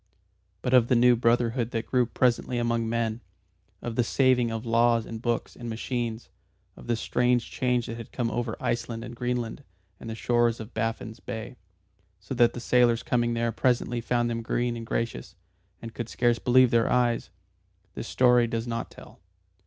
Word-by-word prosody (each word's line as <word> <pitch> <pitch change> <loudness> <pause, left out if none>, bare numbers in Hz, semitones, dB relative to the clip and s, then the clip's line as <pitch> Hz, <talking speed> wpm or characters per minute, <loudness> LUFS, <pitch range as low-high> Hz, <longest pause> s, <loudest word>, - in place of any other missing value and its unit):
But 125 - 0
of 125 -2 +6
the 125 - +3
new 120 +1 +6
brotherhood 115 0 +1
that 115 -2 -3
grew 125 -2 +1
presently 125 0 +1
among 115 -1 0
men, 115 0 -1 0.6
of 120 -1 -4
the 120 - +3
saving 125 0 +2
of 115 +1 -4
laws 115 0 +3
and 115 -1 -7
books 120 -1 -2
and 120 -1 -7
machines, 115 0 -3 0.5
of - - -13
the 120 - +1
strange 120 +1 0
change 125 -2 0
that 115 - -6
had 115 - -9
come 120 -3 -2
over 120 -1 -3
Iceland 115 -1 -2
and 120 0 -8
Greenland 125 +1 -3 0.4
and 115 - -8
the 110 - -4
shores 120 0 +1
of 110 +1 -9
Baffin's 115 0 -3
Bay, 110 +3 -7 0.6
so 100 +7 -7
that 120 -2 +4
the - - -6
sailors 120 -1 +3
coming 120 -1 0
there 115 0 0
presently 120 0 0
found 120 0 0
them 115 -1 -2
green 120 +1 -1
and 115 -1 -7
gracious, 115 0 -3 0.5
and 115 -1 -7
could 120 -1 -5
scarce 120 -1 +1
believe 125 0 +4
their 115 -1 +3
eyes, 120 -2 +1 0.6
this - - -6
story 125 -2 +4
does 115 0 -3
not 115 -1 -4
tell. - - -15
120 Hz, 180 wpm, -27 LUFS, 115-125 Hz, 0.6 s, of